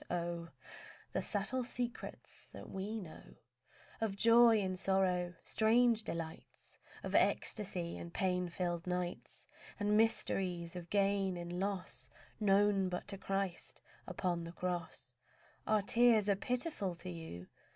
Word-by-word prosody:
Oh 170 -1 -2 0.6
The - - -1
subtle 215 +5 -1
secrets 245 0 -5
that - - -9
we 205 +4 -3
know 175 -6 -11 0.7
Of 215 -3 0
joy 230 +1 +7
in 190 -2 -1
sorrow, 185 -2 +1
strange 230 +1 +4
delights 165 -4 -7 0.2
Of - - -4
ecstasy 180 -5 +1
in 170 - -7
pain 180 0 0
filled 175 0 -2
nights, 180 -1 -4 0.3
And 205 0 +2
mysteries 185 -6 +1
of 175 -1 -7
gain 195 -2 +2
in 175 +1 -5
loss 185 -10 -3 0.3
Known 200 -2 +3
but 180 0 -4
to 200 - -3
Christ 195 -2 -3 0.3
upon 175 -2 -1
the 165 0 -7
cross! 175 -8 -4 0.5
Our 215 -2 +3
tears 230 -1 +5
are 200 - +4
pitiful 245 - -2
to 175 +2 -8
you? 160 - -7
190 Hz, 130 wpm, -35 LUFS, 175-210 Hz, 0.7 s, joy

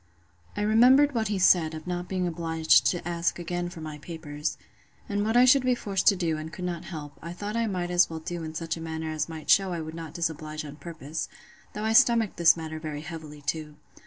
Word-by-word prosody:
I 205 - 0
remembered 255 +7 +5
what 225 -2 0
he 205 -1 -1
said, 170 -4 +4
of 155 - -8
not 180 0 -3
being 185 -1 -1
obliged 165 -2 +3
to 175 -1 -1
ask 170 -1 -1
again 175 0 -3
for 175 -2 -10
my 155 -1 -7
papers; 150 -1 -5 0.5
and 205 0 -1
what 220 +3 +2
I 250 - +7
should 265 +2 +6
be 255 -1 +2
forced 195 -5 -2
to 200 - +7
do, 165 -4 -1
and 155 +1 -6
could 180 +1 -6
not 175 -2 -4
help, 150 -4 -8
I 170 +1 -6
thought 205 +4 -5
I 230 -1 +1
might 180 -3 -2
as 175 0 +4
well 165 - -5
do 170 +2 -5
in 160 0 -6
such 165 +1 -2
a 165 - -8
manner 160 -1 -4
as 155 0 -2
might 160 -2 -8
shew 195 -1 +5
I 175 -2 -3
would 160 0 -7
not 165 -2 -8
disoblige 155 -2 -3
on 145 0 -9
purpose: 160 -2 -6 0.4
though 210 - -5
I 220 - +1
stomached 230 -4 +4
this 170 0 +6
matter 160 -1 -5
very 155 -2 -5
heavily 155 -2 -9
too. 150 +1 -3
170 Hz, 235 wpm, -27 LUFS, 155-190 Hz, 0.5 s, I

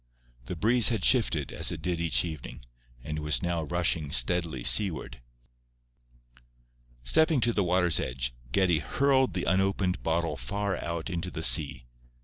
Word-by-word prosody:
The - - -5
breeze 115 +7 +3
had 110 -6 -2
shifted, 90 - +1
as - - 0
it - - -8
did 85 -2 -2
each 75 -8 +1
evening, 80 -6 -9 0.4
and 75 0 -5
was 75 -5 -1
now 85 -1 -2
rushing 80 -2 -1
steadily 75 0 +2
seaward. 70 +3 +3 1.8
Stepping 160 - +2
to 120 0 +1
the 100 - 0
water's 90 -2 +1
edge, - - -3 0.2
Geddie 90 0 +1
hurled 135 +1 0
the 90 - -2
unopened 95 -1 -1
bottle 85 +1 -2
far 100 -1 -4
out 85 +2 -5
into 85 0 -4
the 80 -2 -7
sea. 70 -7 +3
85 Hz, 145 wpm, -27 LUFS, 75-95 Hz, 1.8 s, breeze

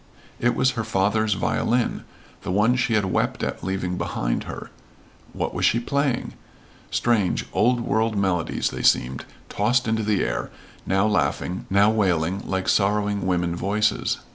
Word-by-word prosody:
It 120 +1 +1
was 130 0 +3
her 115 - -3
father's 105 0 +1
violin, 120 +5 0 0.4
the - - -6
one 105 +6 +3
she 125 -2 +1
had 105 -2 +2
wept 95 - -1
at - - -3
leaving 90 -1 -2
behind - - -2
her. - - -8 0.6
What - - -3
was - - -3
she 115 - +4
playing? 140 +1 -1 0.6
Strange, 110 -6 +1
old 120 +6 +2
world 110 -1 0
melodies 95 -4 0
they - - -5
seemed, 65 +2 +2 0.2
tossed 125 +1 +1
into 110 0 +1
the 105 -2 +1
air, - - -2 0.4
now 95 +2 +2
laughing, 105 0 -1
now 100 +2 +4
wailing 95 -3 +1
like 95 -1 -2
sorrowing 100 -1 +1
women 85 -2 0
voices. 105 +4 0
105 Hz, 150 wpm, -23 LUFS, 95-115 Hz, 0.6 s, she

